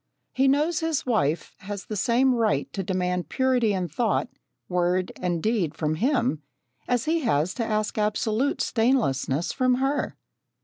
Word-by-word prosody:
He 265 +1 +3
knows 300 +5 +2
his 320 -3 -1
wife 160 - 0
has 200 -1 -6
the 215 - -5
same 245 +6 +3
right 225 -3 0
to 195 - -2
demand 180 -1 -1
purity 255 -4 +2
in 185 -3 -1
thought, 220 +8 0 0.4
word, 180 +1 0
and 175 -3 -2
deed 210 -9 0
from 155 -1 -1
him, 240 - +1 0.5
as 245 -2 +1
he 325 +2 +1
has 180 - +1
to 240 - -2
ask 215 -1 -1
absolute 215 +5 0
stainlessness 215 - +1
from 255 -1 +2
her. 270 +3 -1
220 Hz, 150 wpm, -25 LUFS, 180-255 Hz, 0.5 s, He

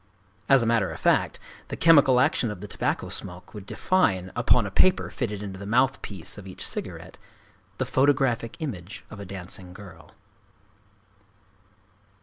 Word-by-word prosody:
As 135 -3 +6
a - - 0
matter 115 -5 +2
of 80 - -7
fact, - - +2 0.3
the - - -6
chemical 145 -6 +6
action 125 -2 +2
of 105 -3 -6
the 105 - -7
tobacco - - -2
smoke 90 +1 -6
would 100 -3 -9
define, 95 - +1
upon 120 -4 +3
a 100 - -5
paper 185 - +3
fitted 105 -5 -3
into 95 -2 -7
the 100 - -7
mouth 125 +4 +2
piece 100 0 -6
of 95 - -11
each 95 - -5
cigarette, - - -6 0.6
the 130 - -1
photographic 130 -2 +1
image 100 - -6
of 105 - -9
a 100 - -7
dancing 90 -1 -8
girl. 90 -5 -13
105 Hz, 155 wpm, -26 LUFS, 95-130 Hz, 0.6 s, As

